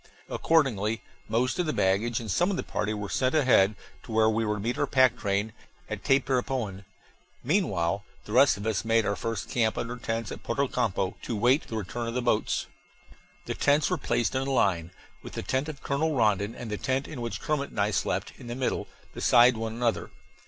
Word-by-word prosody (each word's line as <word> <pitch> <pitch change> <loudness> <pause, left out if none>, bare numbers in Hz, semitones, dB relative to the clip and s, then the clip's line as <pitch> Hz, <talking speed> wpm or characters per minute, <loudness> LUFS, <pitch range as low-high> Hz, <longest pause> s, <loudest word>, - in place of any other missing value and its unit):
Accordingly 115 -9 +1 0.3
most 120 +7 0
of 175 - +1
the 155 - 0
baggage 100 +5 +1
and 110 -4 -4
some 175 - +2
of 195 - -1
the - - -2
party 105 0 -2
were 105 -1 -3
sent 130 +7 0
ahead 120 -8 +4 0.3
to - - -11
where 110 0 +4
we 110 +1 0
were 105 -1 0
to - - -5
meet 115 +4 -2
our - - +1
pack 130 -2 +4
train, 100 +1 -1 0.3
at - - -5
Tapirapoan. 125 -7 0 0.6
Meanwhile 100 - +1 0.2
the - - -9
rest 130 0 +5
of 100 - -7
us 110 -5 0
made 115 -1 +2
our 100 - 0
first 115 -4 -3
camp 110 -3 +1
under 120 +1 -3
tents 115 -2 -3
at - - -7
Porto 140 +4 0
Campo, 100 -7 -1
to 115 - -3
wait 125 +8 +3
the 110 - -4
return 115 +4 -4
of 115 - -4
the 125 - +1
boats. 115 -3 +1 0.8
The - - -2
tents 145 +3 +2
were 180 - +2
placed 120 -3 0
in 130 - 0
a - - -1
line, 90 -9 +2 0.3
with - - -10
the - - -4
tent 130 +4 -1
of 145 -3 -9
Colonel 150 +2 0
Rondon 105 -3 +1
and 115 -3 -7
the 105 - -2
tent 130 +4 -1
in 135 -5 -7
which 115 -1 -4
Kermit 150 -3 -1
and - - -7
I 100 +1 +2
slept, - - -1
in 120 - -10
the 120 - -4
middle, 130 -1 -1 0.3
beside 120 +1 +5
one 110 0 -3
another. 115 -1 -1
115 Hz, 215 wpm, -27 LUFS, 105-130 Hz, 0.8 s, rest